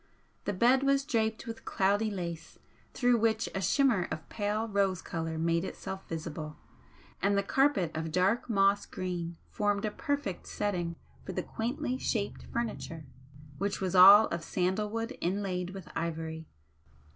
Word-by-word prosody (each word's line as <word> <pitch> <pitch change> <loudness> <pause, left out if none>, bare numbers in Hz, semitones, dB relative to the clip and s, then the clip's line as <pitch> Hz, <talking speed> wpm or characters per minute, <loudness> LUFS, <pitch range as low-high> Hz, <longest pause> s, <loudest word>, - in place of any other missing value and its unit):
The 205 - 0
bed 245 +7 +4
was 275 0 +2
draped 225 -5 0
with 225 -1 -7
cloudy 205 +2 +1
lace 170 -4 -5 0.3
through 245 -2 +3
which 225 0 +1
a 190 - -2
shimmer 195 -1 +3
of 155 - -5
pale 210 +1 -1
rose 195 -3 +1
colour 165 -2 -4
made 165 +1 +1
itself 190 0 -6
visible, 155 -2 -5 0.6
and 200 0 +2
the 200 - +2
carpet 220 - +2
of 160 0 -3
dark 190 +9 +1
moss 200 -1 +3
green 175 -2 -4
formed 205 0 0
a 215 - -1
perfect 285 - -3
setting 175 -5 -2 0.3
for 190 - -6
the - - -2
quaintly 255 +3 -3
shaped 205 -3 -2
furniture, 210 -9 -4 0.5
which 200 0 -1
was 185 -2 -1
all 200 +4 +10
of 170 -1 -3
sandal 190 +5 0
wood 230 +4 -3
inlaid 180 -1 -1
with 190 -1 -9
ivory. 160 -1 -3
195 Hz, 150 wpm, -30 LUFS, 175-225 Hz, 0.6 s, all